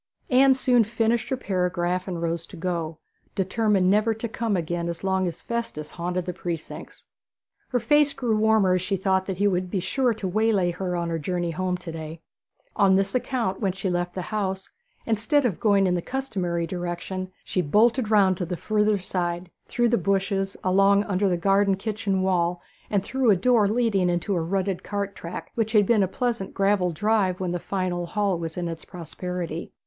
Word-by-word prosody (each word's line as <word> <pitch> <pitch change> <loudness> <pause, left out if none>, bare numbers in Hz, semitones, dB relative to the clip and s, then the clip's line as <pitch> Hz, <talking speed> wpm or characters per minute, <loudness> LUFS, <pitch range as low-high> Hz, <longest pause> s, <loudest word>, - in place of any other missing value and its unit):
Anne 265 +1 +6
soon 250 -2 +3
finished 225 +1 0
her 265 - 0
paragraph 180 -3 -1
and 175 -3 -3
rose 165 0 -2
to 185 - -11
go, 165 -2 -3 0.4
determined 195 0 +2
never 215 +3 +3
to 225 +2 -4
come 225 -2 -1
again 170 0 -2
as 170 +1 -6
long 190 -1 +1
as 170 -1 -6
Festus 230 -11 -4
haunted 180 +1 -3
the 180 - -3
precincts. 170 -3 -7 0.6
Her 250 - +1
face 295 +5 +3
grew 240 -5 -1
warmer 215 -3 +3
as 185 - +1
she 195 +2 -1
thought 190 0 +1
that 190 -2 -3
he 205 +2 +3
would 185 -2 0
be 190 - -1
sure 245 +5 0
to 200 -3 -4
waylay 200 -2 +2
her 180 0 -3
on 170 -1 -2
her 165 - -1
journey 175 +1 -2
home 180 +1 -1
to 180 -2 -8
day. 160 0 -7 0.6
On 195 -2 +4
this 195 0 +1
account, 245 -6 -1
when 195 -4 0
she 190 0 -2
left 175 0 -2
the 185 - -3
house, 190 -2 -3 0.3
instead 230 +6 +1
of 205 -9 0
going 200 -3 +3
in 180 - +2
the 175 - 0
customary 185 -10 -2
direction, 180 +2 -4
she 185 - -1
bolted 220 - +3
round 195 -4 +4
to 180 - -2
the 180 0 -3
further 210 +1 +1
side, 175 -2 -3 0.2
through 240 -1 +1
the 235 - +2
bushes, 195 +1 0
along 195 +2 +4
under 200 -1 +1
the 175 - +1 0.4
kitchen 210 -1 -2
garden 190 - +1
wall, 175 -2 +1 0.3
and 200 -3 +1
through 260 +3 +1
a 205 - +7
door 215 +2 +3
leading 210 -4 +2
into 175 +4 -1
a 170 - 0
rutted 190 +2 -1
cart 200 -1 -3
track, 170 - -7
which 220 -1 -1
had 210 -2 +5
been 220 0 +3
a 190 - +3
pleasant 235 0 -2
gravelled 195 -3 +2
drive 205 -1 +1
when 185 -2 -2
the 175 - -2
fine 185 0 -2
old 175 -1 -4
hall 200 -5 0
was 165 0 -5
in 175 -1 -2
its 165 -1 -6
prosperity. 175 -1 -6
190 Hz, 200 wpm, -25 LUFS, 175-215 Hz, 0.6 s, a